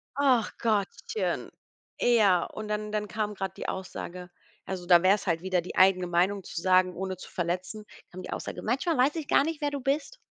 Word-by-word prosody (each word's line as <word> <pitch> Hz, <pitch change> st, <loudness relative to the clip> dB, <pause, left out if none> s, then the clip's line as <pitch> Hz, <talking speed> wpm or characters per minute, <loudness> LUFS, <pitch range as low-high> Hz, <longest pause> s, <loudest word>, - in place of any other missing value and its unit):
Ach 260 Hz, -6 st, +3 dB
Gottchen. 220 Hz, -, -1 dB, 0.5 s
Ja, 205 Hz, -8 st, +4 dB
und 215 Hz, 0 st, -7 dB
dann 210 Hz, 0 st, -3 dB
dann 210 Hz, -1 st, -2 dB
kam 210 Hz, 0 st, -2 dB
grad 190 Hz, -1 st, -5 dB
die -, -, -5 dB
Aussage, 180 Hz, -1 st, -6 dB, 0.4 s
also, 185 Hz, -2 st, -5 dB
da 175 Hz, -1 st, +6 dB
wäre 195 Hz, +2 st, +6 dB
es 200 Hz, -, -8 dB
halt 165 Hz, -1 st, +1 dB
wieder 185 Hz, -1 st, 0 dB
die 180 Hz, -, -8 dB
eigene 185 Hz, -1 st, +5 dB
Meinung 185 Hz, +3 st, +1 dB
zu 170 Hz, -, -6 dB
sagen, 185 Hz, 0 st, +4 dB
ohne 190 Hz, -1 st, -4 dB
zu -, -, -11 dB
verletzen, 185 Hz, +5 st, -3 dB, 0.3 s
kam 185 Hz, +1 st, -8 dB
die -, -, -9 dB
Aussage: -, -, -5 dB
Manchmal 270 Hz, +7 st, 0 dB
weiß 275 Hz, +5 st, +3 dB
ich 315 Hz, -3 st, -4 dB
gar -, -, +4 dB
nicht, 320 Hz, 0 st, -3 dB
wer 290 Hz, -1 st, 0 dB
du 285 Hz, -, -3 dB
bist. 290 Hz, -, -1 dB
195 Hz, 205 wpm, -28 LUFS, 185-240 Hz, 0.5 s, da